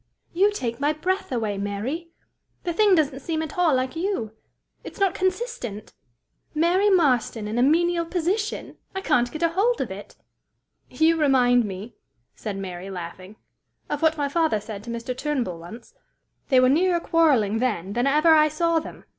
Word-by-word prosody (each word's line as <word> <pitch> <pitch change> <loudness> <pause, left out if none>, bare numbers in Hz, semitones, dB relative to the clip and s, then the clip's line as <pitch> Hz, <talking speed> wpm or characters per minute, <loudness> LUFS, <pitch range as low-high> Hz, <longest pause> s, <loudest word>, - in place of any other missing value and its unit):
"You 395 +4 +3
take 235 - -4
my 290 +2 +1
breath 370 +4 -2
away, 215 -5 -2
Mary! 225 - -4 0.5
The 345 - -2
thing 410 +1 +4
doesn't 290 -4 +1
seem 320 +2 -2
at 310 - -7
all 345 -6 +3
like 255 +3 -1
you! 330 - -2 0.5
It's - - -10
not 390 -2 +2
consistent! 375 - -3 0.6
Mary 355 +6 +3
Marston 255 - +2
in 220 +3 -2
a - - +3
menial 335 +4 +2
position! 370 +5 -2 0.2
I 385 - -2
can't 245 -9 +1
get 315 +2 -4
a 335 - +4
hold 425 +8 +1
of - - -3
it!" - - -9 0.7
"You 325 +1 +2
remind 250 -5 +4
me," 200 +3 -7 0.4
said 205 -2 -6
Mary, 185 -1 -6
laughing, 185 +2 -8 0.6
"of 295 - -2
what 320 0 +3
my 290 -1 0
father 315 -6 +1
said 205 -1 -8
to - - -8
Mr. 235 +2 -4
Turnbull 255 - -2
once. 220 - -11 0.6
They 260 -3 +5
were 255 - +5
nearer 345 +6 +3
quarreling 270 -12 +2
then 205 -6 -1
than 240 +4 +1
ever 305 +4 +5
I 305 -1 +6
saw 330 +2 +1
them. - - -10
295 Hz, 170 wpm, -24 LUFS, 230-340 Hz, 0.7 s, I